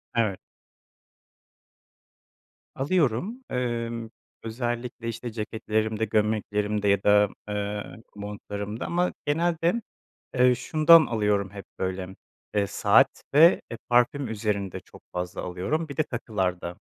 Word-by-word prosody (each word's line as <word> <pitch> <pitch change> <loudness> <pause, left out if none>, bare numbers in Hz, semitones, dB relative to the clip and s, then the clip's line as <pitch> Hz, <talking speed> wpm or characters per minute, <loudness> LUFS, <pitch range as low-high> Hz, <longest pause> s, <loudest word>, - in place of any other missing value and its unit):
Evet. 110 -5 +1 2.4
Alıyorum, 175 - 0
emm, 115 -2 -2 0.3
özellikle, 120 0 -4
işte, 115 +1 -4
ceketlerimde 110 0 -1
gömleklerimde 105 -1 0
ya 100 0 +3
da, 105 -1 +5 0.2
ııı, 105 +2 -4
montlarımda 105 +1 -5
ama 175 +1 0
genelde, 170 +7 +1 0.5
eee, 125 0 +5
şundan 155 +5 +6
alıyorum 105 -3 0
hep, 100 -1 -9
böyle, 95 0 -3 0.5
saat - - +3
ve, 165 +5 +7
eee, 115 - -5
parfüm 120 +2 +3
üzerinde 105 -3 -2
çok - - -17
fazla 90 0 -4
alıyorum 120 - -2
bir 140 - -8
de 155 - +3
takılarda. 95 -9 -2
110 Hz, 105 wpm, -26 LUFS, 105-125 Hz, 2.4 s, ve